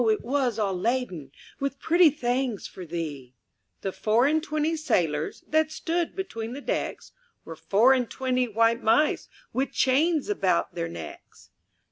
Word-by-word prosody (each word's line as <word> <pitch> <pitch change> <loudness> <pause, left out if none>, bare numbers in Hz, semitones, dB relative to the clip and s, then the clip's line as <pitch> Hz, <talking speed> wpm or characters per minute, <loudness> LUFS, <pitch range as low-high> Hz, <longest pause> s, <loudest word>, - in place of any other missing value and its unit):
it 215 - +1
was 255 -2 0
all 205 -3 0
laden 185 - -2 0.3
With 275 0 -2
pretty 340 0 +5
things 250 -5 -2
for 180 -2 -9
thee! 145 -7 -5 0.5
The 195 - -2
four 220 +6 +2
and 310 +2 +2
twenty 310 +1 -1
sailors 175 - -1
That 315 0 +2
stood 335 +2 -2
between 240 - -5
the 275 - -6
decks - - -3 0.3
Were 165 - -7
four 200 +11 +4
and 250 -3 0
twenty 255 -1 0
white 230 +1 +2
mice, 295 +8 +2 0.2
With 270 +1 -1
chains 295 +4 +2
about 190 - +1
their 85 - -3
necks. 85 -2 -10
245 Hz, 150 wpm, -26 LUFS, 190-295 Hz, 0.5 s, pretty